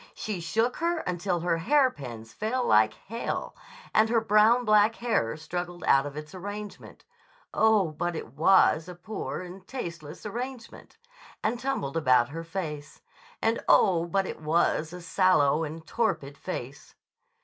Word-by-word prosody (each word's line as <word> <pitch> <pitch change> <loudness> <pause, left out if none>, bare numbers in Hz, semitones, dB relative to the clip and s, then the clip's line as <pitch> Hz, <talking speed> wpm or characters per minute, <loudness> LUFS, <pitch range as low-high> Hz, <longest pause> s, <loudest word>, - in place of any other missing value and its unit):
She 205 -5 -4
shook 225 +9 0
her 335 0 0
until 180 0 -2
her 170 -1 +1
hairpins 145 - 0
fell 245 +4 -1
like 110 0 +4
hail 230 +3 -5 0.4
and 220 +1 +4
her 230 0 +3
brown 225 +3 +4
black 215 +1 +4
hair 185 - -1
struggled 175 +3 -5
out 135 +1 +4
of 145 +1 -8
its 150 +2 -8
arrangement 205 +2 -8 0.5
(oh, 215 -6 +3
but 175 +3 -3
it 125 -6 -7
was 165 +1 +4
a 180 - -8
poor 190 +3 -5
and 185 +1 -10
tasteless 170 - -7
arrangement!) 245 - -7 0.5
and 230 +2 0
tumbled 250 - -2
about 130 -6 +3
her 165 +3 -6
face 155 -4 -6 0.4
(and, 225 +1 +1
oh, 170 -3 +4
but 195 +2 0
it - - -7
was 155 0 +1
a 180 -1 -9
sallow 165 -5 +3
and 160 +1 -6
torpid 165 -12 -1
face!). 140 -6 -7
180 Hz, 150 wpm, -27 LUFS, 155-220 Hz, 0.5 s, like